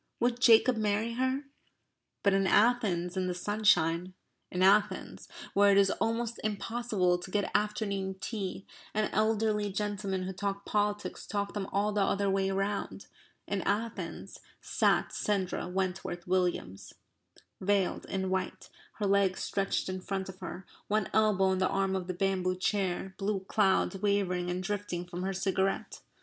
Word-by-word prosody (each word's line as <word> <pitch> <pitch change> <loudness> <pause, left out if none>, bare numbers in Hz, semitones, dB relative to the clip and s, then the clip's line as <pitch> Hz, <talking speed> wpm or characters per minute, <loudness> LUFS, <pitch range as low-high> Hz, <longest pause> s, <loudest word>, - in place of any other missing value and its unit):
would 240 0 +1
Jacob 240 0 +6
marry 215 +2 0
her?" 260 +3 0 0.8
But 200 - +4
in 195 0 +2
Athens 200 -6 +3
in 185 -1 0
the 180 - -2
sunshine, 185 -3 +2 0.3
in 180 +1 0
Athens, 200 +2 +2 0.3
where 200 0 +5
it 195 - +4
is 195 -1 +5
almost 230 +1 -1
impossible 210 -4 0
to 185 - -8
get 205 +1 -1
afternoon 200 -2 -1
tea, 195 -3 -4 0.3
and 215 0 +1
elderly 215 -1 +1
gentlemen 200 -2 -2
who 190 +1 -4
talk 200 +1 -3
politics 205 0 -1
talk 200 -1 -2
them 200 -2 -3
all 205 +2 0
the 205 -1 0
other 200 0 +1
way 195 0 +1
round, 195 +1 -2 0.4
in 200 -1 -1
Athens 220 +3 -3 0.2
sat - - +1
Sandra 195 -4 -1
Wentworth 180 -1 -3
Williams, 175 - -1 0.7
veiled, 195 -1 +1
in 190 -1 -2
white, 190 0 -3 0.2
her 210 - -3
legs 195 -1 +2
stretched 195 0 -1
in 185 0 -4
front 190 0 -3
of 190 0 -10
her, 185 +1 -7 0.2
one 215 -1 0
elbow 215 -3 +3
on 190 -1 +2
the 190 - +2
arm 195 -1 0
of 185 -2 -3
the 185 - -3
bamboo 185 -1 0
chair, 190 0 -1
blue 195 -1 -1
clouds 195 0 +2
wavering 185 -3 +1
and 180 +1 -2
drifting 195 -3 -3
from 175 0 -6
her 190 +1 -1
cigarette. 190 0 -1
195 Hz, 155 wpm, -30 LUFS, 185-210 Hz, 0.8 s, Jacob